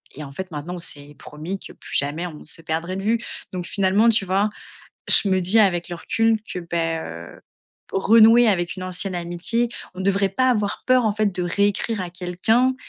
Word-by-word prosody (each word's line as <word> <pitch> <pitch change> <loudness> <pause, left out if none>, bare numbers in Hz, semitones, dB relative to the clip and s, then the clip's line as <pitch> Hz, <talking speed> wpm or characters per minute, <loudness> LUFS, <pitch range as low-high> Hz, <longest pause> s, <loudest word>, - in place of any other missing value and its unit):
Et 150 - -7
en 140 - -9
fait, 185 +6 -6
maintenant, 150 +4 -6
on 175 - -6
s'est 145 -2 -7
promis 165 +6 -6
que - - -11
plus - - -10
jamais 145 +5 -1
on 155 -3 -10
se 165 - -1
perdrait 165 +4 -2
de 195 - -5
vue. 225 +2 +1 0.3
Donc 180 -1 -4
finalement, 200 +4 +3
tu 215 -3 +2
vois, 195 +3 +1 0.6
je 200 - +6
me 190 0 +2
dis 190 +6 +3
avec 175 -4 +2
le 175 - -4
recul 225 +4 +1
que, 180 - -4
beh, 165 -1 -1
heu, 85 +1 -10 0.5
renouer 225 +4 +6
avec 175 -3 -1
une 185 - -6
ancienne 185 +1 -3
amitié, 175 +8 -1 0.3
on 190 - -5
devrait 195 0 +2
pas 255 +6 +1
avoir 210 -4 -1
peur, 255 -2 +4
en 210 - +2
fait, 215 -1 +1
de 180 - -1
réécrire 200 +3 0
à 180 - -4
quelqu'un 195 +9 +1
190 Hz, 205 wpm, -22 LUFS, 170-215 Hz, 0.6 s, je